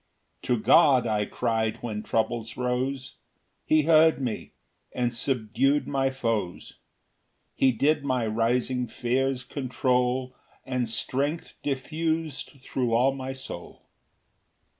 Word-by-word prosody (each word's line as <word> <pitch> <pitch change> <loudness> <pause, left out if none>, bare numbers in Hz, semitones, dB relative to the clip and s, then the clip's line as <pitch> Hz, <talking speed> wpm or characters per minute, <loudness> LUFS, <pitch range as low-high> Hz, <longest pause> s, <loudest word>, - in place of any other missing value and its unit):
4 125 - +2
To 110 - -5
God 135 -7 +6
I 105 -2 0
cry'd 110 -2 -1
when 110 -3 -3
troubles 115 +1 -2
rose; 130 +1 -2 0.5
He 155 0 +4
heard 160 0 +5
me, 125 -5 -4 0.4
and 120 -1 0
subdu'd 125 +3 +1
my 135 -1 +1
foes, 115 -8 -3 0.7
He 130 - +3
did 145 +5 +1
my 130 -4 0
rising 120 +3 0
fears 130 +3 -1
control, 125 -1 0 0.3
And 125 -3 -1
strength 140 +8 -1
diffus'd 155 0 -3
thro' 125 -4 -1
all 130 +4 +4
my 135 -1 -5
soul. 130 -10 -9
125 Hz, 115 wpm, -26 LUFS, 115-135 Hz, 0.7 s, God